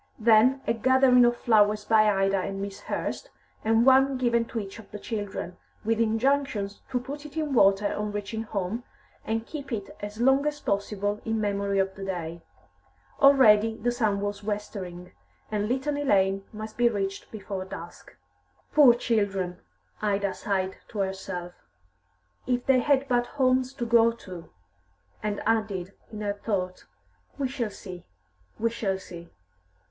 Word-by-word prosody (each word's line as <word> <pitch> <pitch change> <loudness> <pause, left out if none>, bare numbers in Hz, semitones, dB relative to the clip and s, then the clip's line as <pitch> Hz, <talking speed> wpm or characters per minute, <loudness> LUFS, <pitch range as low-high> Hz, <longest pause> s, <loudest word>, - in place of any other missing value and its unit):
Then 230 +4 +5
a 230 - +2
gathering 255 +1 +5
of 240 0 +2
flowers 210 -2 +3
by 215 -1 +5
Ida 195 0 +2
and 195 +1 -4
Miss 200 0 -5
Hurst, - - -4 0.3
and 225 +2 +3
one 270 0 +5
given 235 -2 +2
to 230 - -4
each 195 +1 -7
of 225 - -13
the 210 - -7
children, 205 -5 -5 0.3
with 225 0 +1
injunctions 225 -2 0
to 255 -2 0
put 280 +4 -7
it 300 +1 -10
in 305 -3 -1
water 200 -3 +4
on 210 0 -3
reaching 205 +2 -4
home, 210 +1 -3 0.4
and 225 0 -2
keep 285 -1 -8
it 205 -4 -4
as 205 +1 -7
long 270 +4 +4
as 295 0 -2
possible 205 -1 -2
in 225 -1 -1
memory 200 -1 0
of 195 0 +1
the 195 - -9
day. 170 -3 -4 0.8
Already 225 -6 +6
the 240 +3 0
sun 215 -5 0
was 205 0 -3
westering, 195 -4 -5 0.4
and 210 -1 0
Litany 285 +3 -1
Lane 195 -5 +2
must 215 0 -8
be 240 0 +4
reached 195 -3 -3
before 200 -3 -5
dusk. 175 -2 -10 0.6
"Poor 275 -6 +7
children!" 200 -6 -1 0.4
Ida 200 -2 0
sighed 190 -2 -2
to 220 - -10
herself. 190 -2 -4 0.9
"If 245 -1 0
they 265 -1 +4
had 275 +1 +2
but 245 -2 +1
homes 255 -1 +2
to 240 - -3
go 230 0 +5
to!" 185 -7 -10 0.7
And 210 -1 -3
added, 205 -4 0 0.2
in 215 -1 -7
her 205 -1 -1
thought, 195 -3 -3 0.5
"We 275 -2 0
shall 250 -4 -3
see, 185 -3 -10 0.5
we 230 +1 0
shall 200 -4 -1
see!" 170 -2 -11
215 Hz, 155 wpm, -27 LUFS, 195-240 Hz, 0.9 s, Poor